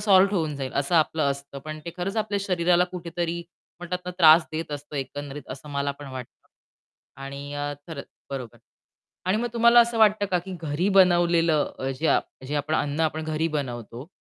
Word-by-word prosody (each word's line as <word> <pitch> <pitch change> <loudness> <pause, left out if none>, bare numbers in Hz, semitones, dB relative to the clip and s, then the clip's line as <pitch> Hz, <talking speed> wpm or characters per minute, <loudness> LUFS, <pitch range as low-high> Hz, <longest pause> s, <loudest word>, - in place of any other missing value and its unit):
Solve 200 -1 +5
होऊन 155 -4 -1
जाईल, 135 -2 -4
असं 140 +5 0
आपलं 160 -1 +3
असतं. 140 0 -6
पण 155 0 -6
ते 170 - -4
खरंच 190 +4 -3
आपल्या 215 -2 0
शरीराला 180 -2 +3
कुठेतरी 170 -1 -3 0.4
म्हणतात 175 +1 -3
ना 180 - -4
त्रास 160 -1 +8
देत 160 0 -4
असतं 145 +1 -6
एकंदरीत 145 +1 -5
असं 140 +3 -8
मला 140 0 -1
पण 145 - -9
वाटतं 130 -2 -10 0.7
आणि 140 +1 -7
अ, 145 0 -3
खरंच, 155 -4 -7 0.2
बरोबर. 130 -5 -6 0.7
आणि 185 +3 +2
मग 240 +2 -1
तुम्हाला 235 +1 +6
असं 235 0 +3
वाटतं 215 -2 +4
का 180 - +4
की 185 +2 -7
घरी 160 +5 0
बनवलेलं 170 -4 +4
अ, 135 - -2
जे 160 - +1
आप - - +3 0.2
जे 150 - -2
आपण 150 +2 0
अन्न 145 0 -1
आपण 155 +1 -5
घरी 155 +1 -1
बनवतो 120 0 -6
160 Hz, 185 wpm, -25 LUFS, 145-180 Hz, 0.7 s, त्रास